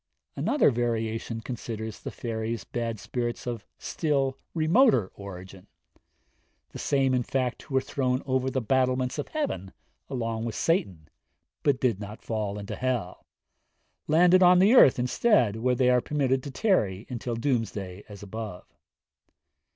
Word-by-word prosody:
Another 295 - +3
variation 115 -1 -2
considers 110 -2 -6
the - - -6
fairies 115 -1 -4
bad 115 -3 -4
spirits 120 +1 -3
of 120 -3 -5
still 140 -4 -1 0.2
remoter 160 - +4
origin 95 -1 -10 1.0
the - - -8
same 135 -2 +1
in 125 - +2
fact 125 0 -2
who 135 - -6
were 130 - +4
thrown 130 -1 -1
over 130 -1 0
the 130 -2 -2
battlements 130 +2 +1
of - - -3
heaven 190 - -3 0.4
along 115 -3 -2
with 115 -2 -4
Satan, 95 - 0 0.5
but 140 -3 +2
did 120 -7 +1
not 105 +1 -8
fall 105 -3 -3
into 100 -1 -6
hell 120 -8 -3 0.8
landed 180 +4 +5
on 180 0 +7
the 195 +6 +5
earth 145 - +7
instead, 125 - +2
where 125 +2 +1
they 125 0 +3
are 125 -1 +4
permitted 135 -2 0
to 140 - -7
tarry 125 - 0
till 120 0 -3
doomsday 115 -7 -2
as 105 -1 -10
above. 105 -2 -7
125 Hz, 145 wpm, -27 LUFS, 110-135 Hz, 1.0 s, on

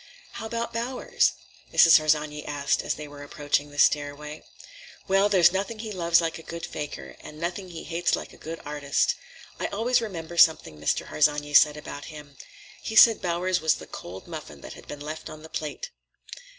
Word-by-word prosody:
"How 220 - -6
about 235 +1 -3
Bowers?" 240 +3 0 0.4
Mrs. 165 -2 +8
Harsanyi 150 -1 0
asked 145 -1 0
as - - -2
they 150 0 -8
were 145 0 -11
approaching 145 0 -1
the 145 - -13
stairway. 150 +1 +1 0.7
"Well, 195 +1 +3
there's 175 -4 +6
nothing 200 +4 -2
he 215 0 -6
loves 170 -3 +3
like 165 -1 -2
a - - -10
good 170 +1 -6
fakir, 70 - -7
and 150 - -11
nothing 175 +3 -4
he 165 -2 -8
hates 170 0 0
like - - -8
a - - -15
good 165 +1 -7
artist. 145 -1 0 0.5
I - - -1
always 235 +4 +1
remember 170 -6 -6
something 160 - +4
Mr. 75 - -1
Harsanyi 145 0 +1
said 150 +1 +6
about 145 -1 -8
him. 150 -2 -11 0.5
He 220 - -5
said 225 0 +8
Bowers 180 0 0
was 160 -1 +3
the - - -10
cold 95 +2 -9
muffin - - -8
that - - -9
had - - -14
been 145 - -8
left 155 +2 -6
on 155 0 -10
the 160 - -11
plate." 160 - -5
160 Hz, 190 wpm, -26 LUFS, 145-185 Hz, 0.7 s, Mrs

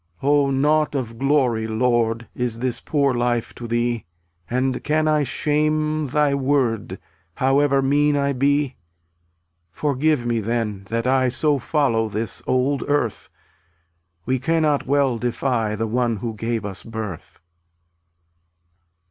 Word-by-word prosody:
272 140 - 0
Oh, 145 -1 +3
nought 150 +3 +2
of 115 -4 -4
glory, 130 -6 +2
Lord, 115 0 0
Is 125 -2 -2
this 125 0 -2
poor 140 -3 +1
life 120 -1 -1
to 120 - -8
Thee, 120 -1 0 0.5
And 130 +1 -1
can 155 +1 +1
I 155 -1 +3
shame 155 +2 0
Thy 145 +1 +2
Word, 130 -8 0 0.4
However 135 +1 +2
mean 145 +2 +2
I 140 0 +1
be? 140 0 +1 0.9
Forgive 145 - 0
me, 120 -1 0
then, 110 -3 -2
that 115 +1 -1
I 130 0 +3
So 140 +4 +1
follow 115 -6 +1
this 110 +2 -3
old 130 +2 +1
earth; 145 -7 -1 1.0
We 130 +1 0
cannot 155 0 +1
well 135 -4 +2
defy 120 -2 -1
The 110 +1 -2
one 120 +1 0
who 115 +2 -4
gave 115 0 -3
us 100 -2 -5
birth. 110 -7 -7
130 Hz, 130 wpm, -22 LUFS, 115-145 Hz, 1.0 s, Oh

